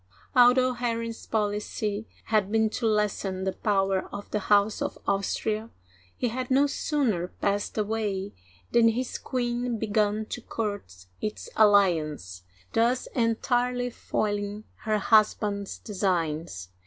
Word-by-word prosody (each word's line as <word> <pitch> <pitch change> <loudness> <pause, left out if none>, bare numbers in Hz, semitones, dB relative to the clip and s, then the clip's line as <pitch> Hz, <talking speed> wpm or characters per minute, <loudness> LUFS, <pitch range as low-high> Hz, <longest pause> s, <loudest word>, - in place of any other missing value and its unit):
Although 255 +1 +6
Henry's 230 -1 -3
policy 210 0 -2 0.2
had 210 -3 +1
been 220 -1 +2
to 230 - -1
lessen 205 -3 0
the 190 - 0
power 195 -2 0
of 205 - -8
the 210 - 0
House 205 +1 +2
of - - -2
Austria, 215 +2 -1 0.5
he 245 - 0
had 255 +2 -4
no 270 +2 +4
sooner 265 - 0
passed 200 +3 -2
away 210 -2 -1 0.4
than 235 -1 +5
his 240 +2 -1
queen 240 -1 -2
began 215 0 +1
to 240 - -6
court 205 - -5 0.2
its 215 0 -4
alliance, 160 - +3 0.3
thus 240 +3 +2
entirely 245 +1 +1
foiling 205 -1 -2 0.2
her 215 -1 +2
husband's 210 -1 +2
designs. 165 - -2
215 Hz, 120 wpm, -27 LUFS, 200-230 Hz, 0.5 s, Although